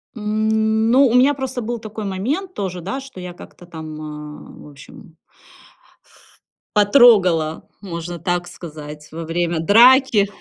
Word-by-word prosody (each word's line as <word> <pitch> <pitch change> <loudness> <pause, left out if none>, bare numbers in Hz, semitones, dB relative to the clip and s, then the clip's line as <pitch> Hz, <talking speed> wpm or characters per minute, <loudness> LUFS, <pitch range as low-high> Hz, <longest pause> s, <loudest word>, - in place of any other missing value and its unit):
М, 220 +1 0
ну, 260 -1 +4
меня 260 +3 +5
просто 260 -2 -5
был 235 +1 -4
такой 215 0 -8
момент 265 - -3
тоже, 185 - -5
да, 195 +10 -4 0.2
я 180 -1 -8
как-то 175 - -14
там 155 -2 -9
в - - -13
общем 145 +2 -15 1.6
потрогала, 200 - +4 0.2
можно 170 -2 -6
так 175 +1 -2
сказать, 150 -3 -10
во 165 +1 -6
время 170 0 -1
драки 235 - +5
190 Hz, 120 wpm, -19 LUFS, 165-225 Hz, 1.6 s, меня